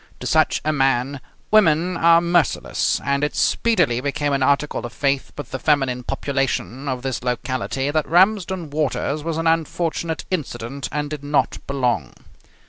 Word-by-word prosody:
To -, -, -7 dB
such -, -, +2 dB
a 155 Hz, -, +1 dB
man 135 Hz, -1 st, +1 dB, 0.3 s
women 180 Hz, -4 st, +4 dB
are 170 Hz, 0 st, +5 dB
merciless, 175 Hz, 0 st, +1 dB
and 140 Hz, +1 st, +1 dB
it 150 Hz, -, -1 dB
speedily 165 Hz, -, +2 dB
became 145 Hz, +1 st, -1 dB
an 140 Hz, -, 0 dB
article 140 Hz, +2 st, +1 dB
of 120 Hz, -, -6 dB
faith 140 Hz, -1 st, -1 dB
with 145 Hz, -5 st, -7 dB
the 130 Hz, -, -4 dB
feminine 135 Hz, -3 st, +1 dB
population 135 Hz, 0 st, -2 dB
of 130 Hz, -1 st, -3 dB
this 130 Hz, -4 st, -2 dB
locality 130 Hz, +2 st, -2 dB
that 155 Hz, 0 st, 0 dB
Ramsden 185 Hz, -2 st, +2 dB
Waters 150 Hz, 0 st, -1 dB
was 165 Hz, -1 st, -2 dB
an 165 Hz, -, -2 dB
unfortunate 165 Hz, 0 st, -1 dB
incident 135 Hz, -5 st, -4 dB
and 150 Hz, 0 st, -2 dB
did 150 Hz, -2 st, -5 dB
not 145 Hz, 0 st, 0 dB
belong. 125 Hz, -, -1 dB
145 Hz, 155 wpm, -21 LUFS, 135-165 Hz, 0.3 s, are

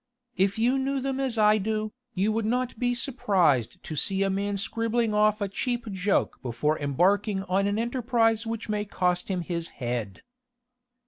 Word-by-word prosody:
If 195 Hz, +2 st, +1 dB
you 245 Hz, +4 st, +2 dB
knew 270 Hz, +1 st, 0 dB
them 270 Hz, 0 st, -2 dB
as 260 Hz, -4 st, -1 dB
I 215 Hz, 0 st, +5 dB
do, 215 Hz, +1 st, -2 dB, 0.2 s
you 200 Hz, +3 st, +2 dB
would 225 Hz, +1 st, 0 dB
not 250 Hz, 0 st, -1 dB
be 245 Hz, 0 st, +1 dB
surprised 190 Hz, -, +1 dB
to 155 Hz, -, -6 dB
see 195 Hz, +6 st, +1 dB
a 195 Hz, -, +1 dB
man 200 Hz, +1 st, -1 dB
scribbling 230 Hz, +2 st, 0 dB
off 210 Hz, 0 st, +3 dB
a 200 Hz, -, +1 dB
cheap 240 Hz, +4 st, -2 dB
joke 190 Hz, +1 st, 0 dB
before 130 Hz, +5 st, -1 dB
embarking 190 Hz, -, +1 dB
on 195 Hz, +1 st, +1 dB
an 205 Hz, +1 st, 0 dB
enterprise 230 Hz, -1 st, +1 dB
which 225 Hz, -1 st, -4 dB
may 210 Hz, -1 st, -1 dB
cost 180 Hz, -3 st, -1 dB
him 185 Hz, -2 st, -1 dB
his 170 Hz, -1 st, -3 dB
head." 120 Hz, -5 st, -4 dB
210 Hz, 175 wpm, -27 LUFS, 185-230 Hz, 0.2 s, I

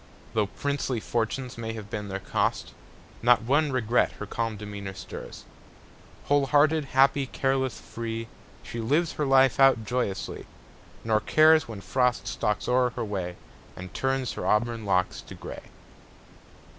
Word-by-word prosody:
Though 110 Hz, -2 st, +1 dB
princely 140 Hz, 0 st, -2 dB
fortunes 120 Hz, +3 st, -2 dB
may 115 Hz, -1 st, -4 dB
have 105 Hz, -2 st, -8 dB
been 105 Hz, -1 st, -4 dB
their 95 Hz, -1 st, -3 dB
cost, -, -, -1 dB, 0.5 s
Not 120 Hz, -1 st, +5 dB
one 145 Hz, +5 st, +2 dB
regret 120 Hz, -2 st, +2 dB
her -, -, -7 dB
calm 115 Hz, -2 st, -3 dB
demeanor 100 Hz, -2 st, -7 dB
stirs. -, -, -9 dB, 0.8 s
Whole 145 Hz, -1 st, +2 dB
hearted, 150 Hz, +2 st, +3 dB
happy, 135 Hz, +1 st, +3 dB
careless, 135 Hz, -1 st, -1 dB
free, 115 Hz, 0 st, -5 dB, 0.4 s
She 120 Hz, -, -6 dB
lives 150 Hz, +9 st, +1 dB
her 150 Hz, -, -2 dB
life 135 Hz, -1 st, +4 dB
out 135 Hz, -5 st, +5 dB
joyously, 120 Hz, -5 st, -3 dB, 0.6 s
Nor 110 Hz, -1 st, +2 dB
cares 155 Hz, +5 st, +5 dB
when 110 Hz, -4 st, -7 dB
Frost 125 Hz, +2 st, 0 dB
stalks 105 Hz, -1 st, -1 dB
o'er 125 Hz, 0 st, +3 dB
her 120 Hz, -, -2 dB
way 95 Hz, -4 st, -4 dB, 0.4 s
And 90 Hz, 0 st, -9 dB
turns 135 Hz, -1 st, -1 dB
her -, -, -4 dB
auburn 115 Hz, +1 st, +1 dB
locks 95 Hz, -2 st, +1 dB
to -, -, -11 dB
gray. -, -, -9 dB
120 Hz, 145 wpm, -27 LUFS, 110-135 Hz, 0.8 s, Not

